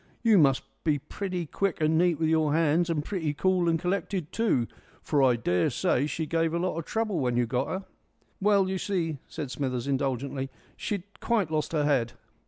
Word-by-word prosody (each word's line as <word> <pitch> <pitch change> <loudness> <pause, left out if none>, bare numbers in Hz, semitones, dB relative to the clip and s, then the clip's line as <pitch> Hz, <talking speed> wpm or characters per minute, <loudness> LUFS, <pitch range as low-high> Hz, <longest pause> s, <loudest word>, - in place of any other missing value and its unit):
You 220 -4 +6
must 135 -4 +4 0.2
be 155 -3 +2
pretty 180 +4 -4
quick 195 +4 -1
and 155 0 +2
neat 170 -1 +3
with 160 - +2
your 155 -2 +2
hands, 165 +2 +2
and 150 -3 -1
pretty 160 -7 -2
cool 180 +1 +2
and 165 - +2
collected 180 -2 -2
too, 210 - +1 0.4
for 145 -3 +2
I 130 -2 +5
daresay 115 +6 +1
she 160 +1 -2
give 165 +1 0
a - - +2
lot 180 0 -1
of 165 - -6
trouble 220 -5 -1
when 125 -3 0
you 120 - +3
got 125 +3 -1
'er." 190 +1 -3 0.6
"Well, 200 -1 +4
you 190 0 -2
see," 165 -8 -1
said 140 -4 -6
Smithers, 130 -4 -2
indulgently, 135 0 -1 0.3
"she'd 200 -4 -3 0.2
quite 215 -9 0
lost 155 -1 -1
her 150 -2 +2
head." 125 -5 +1
160 Hz, 190 wpm, -28 LUFS, 140-185 Hz, 0.6 s, You